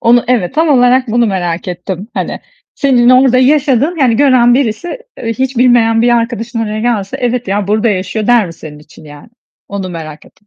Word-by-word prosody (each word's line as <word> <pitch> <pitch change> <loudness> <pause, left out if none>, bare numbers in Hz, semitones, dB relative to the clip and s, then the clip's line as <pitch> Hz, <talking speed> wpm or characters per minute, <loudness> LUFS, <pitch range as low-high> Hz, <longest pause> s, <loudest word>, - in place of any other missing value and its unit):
Onu 240 +1 +3
evet, 235 -4 0
tam 320 +1 +1
olarak 255 -1 +3
bunu 235 +1 +1
merak 180 -1 -3
ettim. 180 +3 -6
Hani - - -4 0.3
senin 250 -3 +2
orada 255 0 +4
yaşadığın, 280 +3 +2
hani 240 -5 +2
gören 250 -3 +4
birisi, 275 - -2 0.2
eee, 230 -1 -3
hiç 260 +2 -3
bilmeyen 235 -2 +3
bir 245 - +2
arkadaşın 230 0 -3
oraya 215 -1 -3
gelse, 220 -5 -2
evet 245 -3 -2
ya 200 0 -1
burada 215 +2 +1
yaşıyor 195 +2 -2
der 240 -5 +3
mi 165 - -9
senin 150 -2 -12
için 150 +1 -17
yani? 145 +3 -14 0.4
Onu 195 -2 -5
merak 155 -3 -9
ettim. 205 - -25
230 Hz, 190 wpm, -12 LUFS, 195-250 Hz, 0.4 s, orada